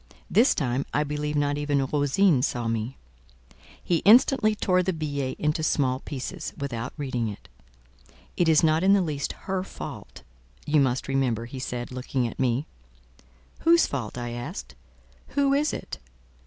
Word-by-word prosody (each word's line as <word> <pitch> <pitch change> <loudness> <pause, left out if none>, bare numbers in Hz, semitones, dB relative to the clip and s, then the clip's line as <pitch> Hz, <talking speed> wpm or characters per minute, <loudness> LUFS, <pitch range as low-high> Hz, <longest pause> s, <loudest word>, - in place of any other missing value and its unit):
This 235 +6 +5
time, 130 -2 0
I 150 - +3
believe 150 0 -3
not 145 0 +1
even 145 -2 +1
Rosine 145 +3 +2
saw 120 -3 -1
me. 115 +3 -2 0.9
He 175 - +2
instantly 215 - +5
tore 185 -3 +2
the 185 +1 -1
billet 145 -4 -3
into 150 +1 0
small 130 -4 +1
pieces, 155 +5 -6
without 125 -4 -4
reading 125 -5 -2
it. 105 - -8 0.9
"It 175 -2 +2
is 155 0 +5
not 160 0 +3
in 195 +1 +5
the 200 - +4
least 145 -4 -3
her 190 -1 -1
fault, - - -9 0.4
you 150 0 +3
must 130 -2 +1
remember," 130 -4 0
he 130 +2 -8
said, 125 -1 -4
looking 130 0 -2
at - - -9
me. 130 +2 +1 0.9
"Whose 335 0 +5
fault?" 125 -5 -4
I 120 -1 -4
asked. 120 - -6 0.6
"Who 280 -1 +4
is 290 +2 +2
it?" - - -6
145 Hz, 155 wpm, -26 LUFS, 130-170 Hz, 0.9 s, This